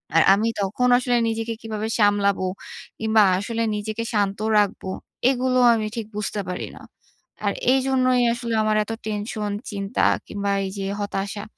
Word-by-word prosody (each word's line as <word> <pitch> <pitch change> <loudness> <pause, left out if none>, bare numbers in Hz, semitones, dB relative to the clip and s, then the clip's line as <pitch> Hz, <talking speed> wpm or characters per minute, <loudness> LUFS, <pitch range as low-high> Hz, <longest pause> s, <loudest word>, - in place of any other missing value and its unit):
আর 165 - +7
আমি 215 +3 +1
তখন 215 +6 0
আসলে 245 -1 +1
নিজেকে 225 +1 -2
কীভাবে 220 -1 -4
সামলাবো? 200 -2 +3 0.5
কিংবা 220 -1 +4 0.2
আসলে 230 +2 -2
নিজেকে 215 +2 -3
শান্ত 200 -1 0 0.2
রাখবো? 200 -2 0 0.4
এগুলো 255 -1 +1
আমি 215 -1 -1
ঠিক 230 - -3
বুঝতে 210 0 -2
পারি 180 - -4
না। - - -12 0.6
আর 200 - +2 0.2
এইজন্যই 255 -2 +2
আসলে 235 -1 -4
আমার 215 0 +1
এত 210 - -7
টেনশন, 210 0 -3 0.2
চিন্তা 200 0 -2 0.2
কিংবা 200 -1 -2
এই 190 - -3
যে 195 - -2 0.2
হতাশা। 205 +1 -3
215 Hz, 150 wpm, -23 LUFS, 205-230 Hz, 0.6 s, আর